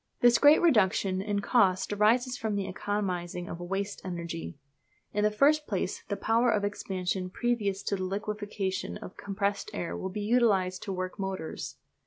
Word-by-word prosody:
This 240 -1 +6
great 295 +4 +7
reduction 195 - +3
in 205 0 -1
cost 200 -4 +2
arises 240 +5 +3
from 220 -3 -2
the 200 -1 -1
economising 180 -3 -3
of 170 - -6
"waste 195 +3 -3
energy." 170 -4 -5 0.6
In 210 - +1
the 210 - +5
first 295 +8 +3
place 190 -2 -2
the 200 - -2
power 230 +4 +2
of 210 -3 +2
expansion 185 -2 -2
previous 205 -2 -1
to 200 - 0
the 190 - -3
liquefaction 200 -1 -3
of - - -10
the - - -11
compressed 200 0 -1
air 170 - -3
will 190 - -4
be 205 +3 -4
utilised 205 -5 +2
to 195 - -3
work 185 +1 -4
motors. 190 -4 -4
200 Hz, 170 wpm, -29 LUFS, 185-215 Hz, 0.6 s, great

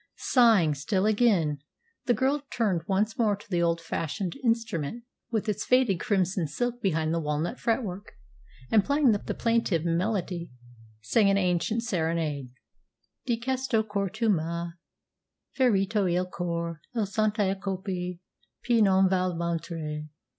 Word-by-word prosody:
Sighing 225 - +4
still 185 +8 -1
again, 205 -10 +2 0.5
the 245 - +4
girl 270 +5 +1
turned 200 -8 0
once 210 +5 0
more 215 -3 +3
to 200 - -16
the 175 -4 0
old 170 0 +2
fashioned 165 +2 -3
instrument, 225 - -1 0.3
with 220 -3 -1
its 210 - -1
faded 250 -8 +3
crimson 185 -5 0
silk 245 +10 -3
behind 160 -5 0
the 170 - +1
walnut 155 +7 -2
fretwork, 215 -5 -2 0.6
and, 215 -3 +5
playing 280 -1 +3
the 205 - +1 0.2
plaintive 230 -8 +1
melody, 175 0 -1 0.5
sang 200 - +3
an 195 - +3
ancient 185 +5 0
serenade: 160 - -1 0.8
Di 235 -2 +1
questo 260 -2 0
cor 200 -2 -2
tu 215 +4 -2
m'hai 170 -2 0 0.8
ferito 205 -6 +2
il 180 +1 +1
core 170 -3 -4
A 220 -3 +1
cento 210 -1 +1
colpi, 190 -2 -4 0.4
piu 235 -2 +3
non 190 -2 +5
val 185 -1 +1
mentire. 165 -2 -3
195 Hz, 135 wpm, -27 LUFS, 170-225 Hz, 0.8 s, and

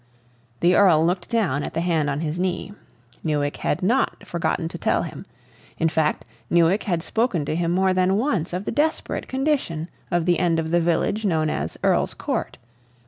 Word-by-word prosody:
The 175 +1 +4
Earl 165 -6 +5
looked 175 0 -1
down 205 - +1
at - - -5
the 165 - 0
hand 165 -4 +1
on 145 +2 -2
his 160 +1 -3
knee. 185 +2 -2 0.5
Newick 145 -2 -1
had - - -1
not 240 +8 +1
forgotten 170 0 -1
to - - -8
tell - - +1
him; - - -8 0.5
in 165 - +2
fact, 155 -7 0 0.2
Newick 170 +4 +3
had 175 -4 -1
spoken 220 - 0
to 155 - -2
him 170 0 0
more 190 +2 +2
than 185 +1 +2
once 215 - 0
of 180 +3 -3
the - - -2
desperate 315 +2 -1
condition 260 - -1 0.2
of 175 -2 +1
the 175 -1 +2
end 170 -2 +2
of 160 0 -2
the 175 0 +3
village 175 +6 0
known 160 -6 +1
as 80 +3 -3
Earl's - - +2
Court. - - -3
175 Hz, 190 wpm, -23 LUFS, 160-190 Hz, 0.5 s, Earl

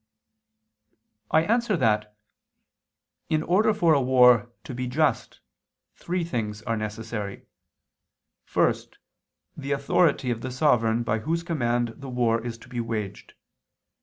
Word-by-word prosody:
I 160 - +4
answer 225 0 +1
that, 105 -5 0 1.1
In 155 -1 +1
order 210 +6 +3
for 175 -6 +3
a 140 - +3
war 125 -2 +5
to - - -7
be 125 +1 -3
just, 150 +5 0 0.5
three 180 0 -3
things 110 -9 -4
are 115 - -1
necessary. 110 -1 -5 1.0
First, - - 0 0.6
the 140 -1 -3
authority 140 -1 +2
of 115 -1 -3
the 130 - -4
sovereign 120 -4 +2
by 110 -1 0
whose 165 +8 -2
command 120 -8 0
the 140 -1 -9
war 115 -2 +1
is 120 -1 -5
to - - -19
be 125 -1 -5
waged. 110 -4 -5
125 Hz, 130 wpm, -25 LUFS, 115-155 Hz, 1.1 s, war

